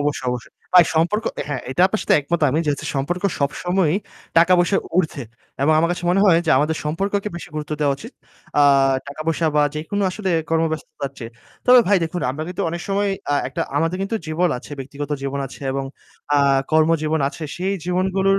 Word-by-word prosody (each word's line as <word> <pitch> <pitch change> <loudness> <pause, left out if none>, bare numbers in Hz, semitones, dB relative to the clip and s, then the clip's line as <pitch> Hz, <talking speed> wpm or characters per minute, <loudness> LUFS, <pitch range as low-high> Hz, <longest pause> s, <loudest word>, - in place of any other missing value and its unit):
অবশ্যই, 145 -3 -1
অবশ্যই 125 -1 -6 0.2
ভাই 180 -1 +9
সম্পর্ক 175 +8 +1 0.2
হ্যাঁ, 145 -3 -3
এটা 155 +7 +1
আপনার 210 +3 -2
সাথে - - +3
একমত 170 +4 -2
আমি 150 - +1
যেহেতু 145 -1 -1
সম্পর্ক 155 +7 -2 0.2
সবসময়ই 175 +4 +1 0.4
টাকা 170 +2 +5
পয়সার 175 +3 +2 0.2
উর্ধ্বে 155 -7 0 0.4
এবং 155 - +4
আমার 165 +1 +3
কাছে 175 - -6
মনে 190 +2 +3
হয় 175 -5 +6
যে - - +2
আমাদের 155 +2 +1
সম্পর্ককে 195 +7 -1
বেশি 170 - -8
গুরুত্ব 150 0 -4
দেওয়া 145 -2 +2
উচিত। 230 - -11 0.5
আ - - +7 0.4
টাকা 140 +2 -8
পয়সা 165 0 +1
বা 150 - +5
যেকোনো 160 +7 -2
আসলে 190 0 -3 0.2
কর্মব্যস্ততার 160 -4 -2
চেয়ে। 115 -2 -7 0.4
তবে 250 0 +8
ভাই 205 - +5
দেখুন, 175 +2 -4
আমরা 145 +4 -5
কিন্তু 180 - -3
অনেক 170 +1 -4
সময় 200 +1 +1 0.2
আ - - +3
একটা 135 - -3
আমাদের 165 +4 +1
কিন্তু 200 +3 -1
জীবন 165 +3 +1
আছে, 135 - -12
ব্যক্তিগত 140 +2 -6
জীবন 140 0 -3
আছে 135 - -13
এবং 135 0 -2 0.5
আ - - +5 0.3
কর্মজীবন 160 0 +2
আছে। 155 - -10
সেই 190 +2 -1
জীবনগুলোর 190 +2 +1
165 Hz, 190 wpm, -21 LUFS, 145-185 Hz, 0.5 s, ভাই